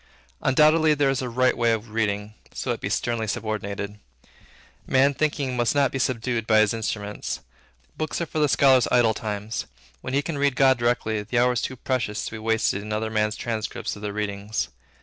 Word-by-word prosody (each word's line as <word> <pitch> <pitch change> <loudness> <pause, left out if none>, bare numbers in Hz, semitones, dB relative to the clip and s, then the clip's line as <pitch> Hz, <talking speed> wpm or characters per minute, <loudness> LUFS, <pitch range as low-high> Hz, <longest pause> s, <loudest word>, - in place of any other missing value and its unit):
Undoubtedly 155 +3 +4
there 140 -2 +2
is 135 - -1
a 125 - -3
right 130 +2 +2
way 115 -1 +2
of 110 0 -2
reading, 105 -1 -1 0.2
so - - -2
it - - -3
be - - -2
sternly 115 -2 -1
subordinated. 105 -2 -4 0.9
Man 135 +2 +4
Thinking 140 -3 -1
must 120 +2 +1
not 140 -3 +3
be 130 - -3
subdued 120 -3 -1
by 110 - +5
his 110 0 +4
instruments. 105 -2 -4 0.6
Books 155 - -2
are 170 - -1
for 155 - -4
the 150 -1 +3
scholar's 130 -2 +5
idle 120 -3 +4
times. 105 0 -4 0.3
When 130 - -3
he 140 - +2
can 150 -3 -4
read 140 -2 +2
God 130 -2 +4
directly, 120 -3 0
the 110 +4 -3
hour 125 +1 +4
is 120 - -1
too 130 - -3
precious 120 -4 -2
to - - -5
be 110 - -6
wasted 110 -2 +1
in 105 +1 -7
other 110 +1 -1
men's 105 0 +1
transcripts 110 -2 -3
of 105 - -11
their 105 -1 -3
readings. 105 +1 -3
115 Hz, 200 wpm, -24 LUFS, 105-130 Hz, 0.9 s, by